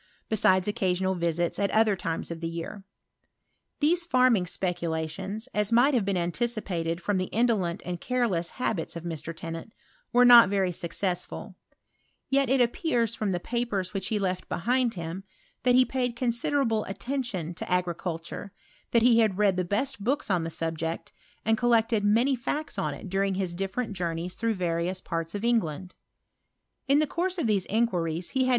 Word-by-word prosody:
besides 190 -3 +3
occasional 190 -3 0
visita 170 0 -1
at 200 - +2
other 215 -2 +3
times* 170 -3 -4
of 165 0 -7
ar. 170 +5 -5 1.0
These 340 +4 +3
farming 255 - +3
speculations^ 175 +4 -2
as 210 +1 0
mights 250 +5 +5
ecai 200 -5 +1
anticipated 175 -2 -1
fVom 205 -2 +1
the 185 - 0
indolent 210 -6 0
and 175 -1 -4
careles9 210 -6 -1
of 170 - -6
Mr. 165 -1 -5
Tennant, 165 +5 -6 0.4
were 245 +1 +6
not 240 -5 +9
very 195 -2 +1
successful, 175 +1 -3 0.8
appears 245 -2 +2
fhim 210 -3 -1
the 175 - -1
papers 215 -3 -2
which 195 -2 -3
he 220 - 0
left 185 -2 -2
behind 245 +4 +1
hat 165 0 -5 0.5
he 250 0 +6
paid 250 -2 -2
considerable 235 -1 +1
attention 200 - -3
to 180 - -6
agricul 175 +1 -3 0.4
lat 230 -1 +4
he 235 -1 +6
had 215 -5 +2
read 205 -2 +3
the 180 - 0
best 210 +6 -2
books 265 -1 0
on 175 -3 +2
the 165 - -3
subject, 165 0 -3 0.3
•llected 225 0 +3
many 230 +7 +3
facts 295 +6 -3
on - - -1
it - - -9
during 195 +1 0
his 185 -2 -1
different 195 +4 -3
ys 170 +1 -2
through 225 +1 -1
various 175 0 -1
parts 165 +1 -4
of 205 +3 -3
England. 185 -7 0 0.9
In 280 +2 +4
tiie 345 +5 -1
of 330 - 0
these 205 -4 +1
inquiries 180 -7 0
he 260 -1 +1
had. - - +1
200 Hz, 155 wpm, -27 LUFS, 175-235 Hz, 1.0 s, not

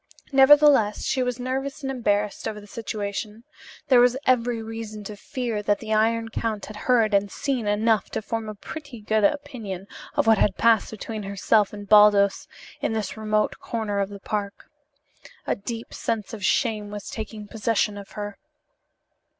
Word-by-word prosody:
Nevertheless, 270 -5 +6
she 260 - 0
was 250 -1 -1
nervous 270 +3 -3
and 270 - -2
embarrassed 210 -5 -1
over 210 - -4
the 205 - -13
situation. 210 0 -5 0.4
There 255 -3 +6
was 245 +1 +4
every 245 -2 +2
reason 220 -1 -7
to 210 +1 -7
fear 230 0 -3
that 205 0 +1
the 220 0 -4
Iron 225 +1 +2
Count 220 -2 -3
had 215 - -10
heard 225 -1 +2
and 200 0 +2
seen 260 -6 -2
enough 215 0 +2
to - - -4
form 225 0 -3
a 215 - -6
pretty 285 +3 -9
good 215 0 0
opinion 225 -7 -1 0.3
of - - +2
what 225 -2 +5
had 190 - +2
passed 230 -2 +4
between 220 0 -6
herself 200 +1 +2
and 205 -1 -9
Baldos 205 -1 +5 0.3
in - - 0
this 220 -2 -3
remote 215 -1 0
corner 215 -3 -3
of 200 0 0
the 200 -1 -9
park. 200 0 -5 0.7
A - - 0
deep 230 +3 -7
sense 225 -2 -3
of 210 -3 -7
shame 215 0 +1
was 205 0 -7
taking 215 -1 -6
possession 215 -1 0
of 200 -1 -10
her. 205 -1 -6
215 Hz, 170 wpm, -24 LUFS, 205-235 Hz, 0.7 s, Nevertheless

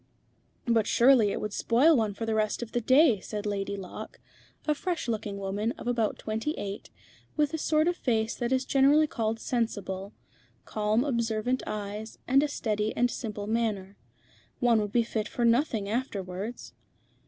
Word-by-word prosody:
"But 230 -3 +2
surely 240 -4 +5
it - - -2
would 210 -1 -4
spoil 275 +8 +4
one 215 -5 0
for 225 - -4
the 225 - -1
rest 215 +2 0
of 230 - -9
the 240 - 0
day," 260 -2 +5
said 210 +2 -6
Lady 200 -1 -2
Locke, 185 -2 -8 0.5
a 305 - +4
fresh 345 +1 -3
looking 215 -3 -3
woman 200 +4 -2
of - - -11
about 235 -3 0
twenty 225 +8 -3
eight, 200 0 -6 0.5
with 300 -1 +2
the 320 - -3
sort 310 +1 +2
of 350 - +2
face 225 -3 0
that 240 0 -3
is 260 0 +1
generally 280 +3 +5
called 225 -5 -2
sensible, 205 -5 -3 0.5
calm 215 +2 +1
observant 235 -1 0
eyes, 210 +1 -5
and 270 +2 +5
a 300 - +1
steady 215 -6 -2
and 245 0 +2
simple 210 -4 -5
manner. 210 -3 -1 0.6
"One 235 -3 +4
would 205 -1 -3
be 235 +1 +3
fit 220 -1 -3
for 240 - -1
nothing 230 -3 +2
afterwards." 205 -2 -4
225 Hz, 170 wpm, -28 LUFS, 210-250 Hz, 0.6 s, surely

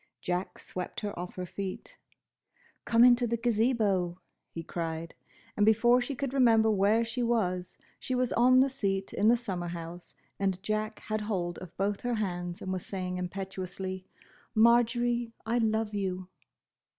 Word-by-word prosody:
Jack 180 +1 -3
swept 180 -1 -6
her 205 -1 -3
off 180 0 -6
her 185 - -4
feet. 195 - -6 0.9
"Come 230 0 +5
into 245 0 +6
the 235 +1 0
Gazebo!" 215 -6 +1 0.3
he 165 - -7
cried, 165 -1 -4 0.4
and 210 - +2
before 240 +3 +5
she 270 +3 -3
could 270 0 -3
remember 225 -4 +5
where 210 +3 +3
she 225 +2 -3
was, 185 -7 0 0.2
she 255 - -2
was 250 -1 +1
on 255 +2 +5
the 275 - +3
seat 195 -7 -2
in 205 - +2
the 240 +2 +6
summer 190 -7 -4
house 170 0 -7 0.2
and 190 -1 -1
Jack 215 0 -2
had 215 0 -2
hold 180 -5 -2
of 180 -2 -11
both 200 +1 -1
her 245 -1 -1
hands 175 -4 -3
and 190 - -2
was 185 - -3
saying 180 -2 -4
impetuously, 190 0 -5 0.5
"Marjory, 235 +1 +3
I 235 +2 +1
love 220 -1 0
you!" 185 -2 -3
205 Hz, 160 wpm, -30 LUFS, 185-235 Hz, 0.9 s, into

